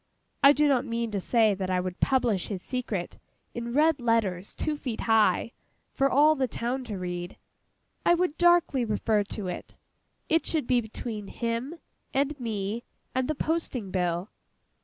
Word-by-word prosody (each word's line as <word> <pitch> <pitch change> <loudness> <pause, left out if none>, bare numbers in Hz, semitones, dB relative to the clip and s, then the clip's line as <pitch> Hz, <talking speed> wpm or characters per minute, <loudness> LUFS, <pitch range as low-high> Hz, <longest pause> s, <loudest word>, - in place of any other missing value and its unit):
I 280 - +9
do 295 +1 +3
not 265 -4 +3
mean 230 -1 -2
to 205 - -1
say 220 +2 +3
that 190 -1 -3
I 185 -1 +1
would 180 0 -4
publish 240 -8 +1
his 190 -4 -5
secret, 230 -9 -4 0.3
in 235 0 -4
red 300 +1 +3
letters 210 -6 0
two 305 - -1
feet 255 -6 -4
high, 225 0 +3 0.4
for 275 0 +2
all 295 +4 +5
the 270 -4 0
town 250 +2 -3
to 210 -4 -5
read: 180 0 -5 0.7
I 345 - +5
would 345 -3 0
darkly 345 -7 +4
refer 215 -1 +1
to 200 -1 -5
it. 180 - -7 0.5
It 325 +1 +2
should 310 -6 0
be 245 0 +3
between 220 -1 -6
him, 235 +8 -3 0.4
and 280 +1 +1
me, 220 -1 -3 0.3
and 260 0 0
the 310 - -1
Posting 275 - -2
Bill. 180 +1 -1
235 Hz, 165 wpm, -27 LUFS, 205-275 Hz, 0.7 s, I